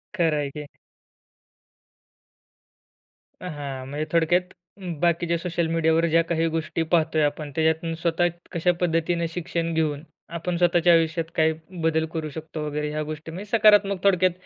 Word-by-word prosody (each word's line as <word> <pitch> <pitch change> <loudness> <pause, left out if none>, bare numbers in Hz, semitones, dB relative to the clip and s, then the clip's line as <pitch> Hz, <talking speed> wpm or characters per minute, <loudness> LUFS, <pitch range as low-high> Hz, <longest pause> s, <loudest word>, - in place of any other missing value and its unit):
खर 165 -5 +2
आहे 145 -1 -1
की. 150 +1 -7 2.8
हां, 145 -6 -6
म्हणजे 145 +3 -3
थोडक्यात, 170 +2 +3 0.6
बाकीच्या 170 0 +1
सोशल 170 -1 -2
मीडियावर 165 0 +2
ज्या 165 +1 +4
काही 165 0 0
गोष्टी 165 0 -2
पाहतोय 160 -2 +3
आपण, 145 0 -2
त्याच्यातून 160 +1 +1
स्वतः 170 +1 +1 0.2
कशा 180 0 +2
पद्धतीने 170 0 +1
शिक्षण 165 0 -3
घेऊन, 155 -2 -1 0.3
आपण 175 +1 -2
स्वतःच्या 175 0 +4
आयुष्यात 165 0 +1
काही 160 0 +3 0.3
बदल 160 0 +1
करू 160 -2 -3
शकतो 155 0 -6
वगैरे, 150 0 -2
ह्या 155 0 -2
गोष्टी 155 +1 -7
म्हणजे 195 +5 -8
सकारात्मक, 205 -3 +4
थोडक्यात 185 -2 +4
165 Hz, 135 wpm, -24 LUFS, 155-170 Hz, 2.8 s, ज्या